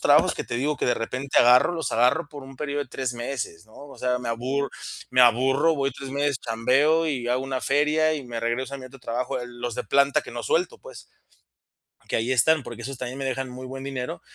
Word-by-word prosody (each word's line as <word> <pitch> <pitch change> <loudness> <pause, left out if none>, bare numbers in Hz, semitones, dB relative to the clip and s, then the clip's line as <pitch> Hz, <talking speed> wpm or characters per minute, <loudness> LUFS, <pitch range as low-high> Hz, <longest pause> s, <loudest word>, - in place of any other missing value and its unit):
trabajos - - +5
que - - -3
te 120 - -4
digo 145 +4 0
que - - -1
de 125 - +3
repente 125 +4 -1
agarro, 125 +7 +6
los 165 -5 -3
agarro 125 +5 +3
por 145 -2 -9
un 135 0 -12
período 145 0 -2
de 140 - -12
tres 130 0 -3
meses, 120 -8 -5
¿no?, 110 - -20
o 140 - -12
sea, 125 0 0
me 125 -1 -5
aburro 130 +4 -1 0.4
me 130 - +4
aburro, 135 +6 +4
voy 135 -1 0
3 135 +1 -8
meses, 140 -1 0
chambeo 140 +8 +2
y 125 -5 -2
hago 125 +1 +1
una 135 -1 -2
feria 150 +2 +2
y 145 -3 -5
me 120 -1 -4
regreso 120 +4 -2
a - - -5
mi 130 - -9
otro 135 +2 -14
trabajo, 125 +2 -2
el 120 0 -9
los 120 -1 -3
de - - -3
planta 140 +6 +3
que - - -10
no 120 0 -5
suelto, 175 +7 0
pues - - -11 1.1
que - - +1
ahí 115 +3 0
están, 145 +3 +3
porque 120 0 -8
esos 135 +1 -6
también 125 +1 -5
me 135 - -3
dejan 130 0 -2
muy 130 +1 -8
buen 135 +1 -7
dinero, 130 -2 -4
130 Hz, 240 wpm, -25 LUFS, 120-140 Hz, 1.1 s, agarro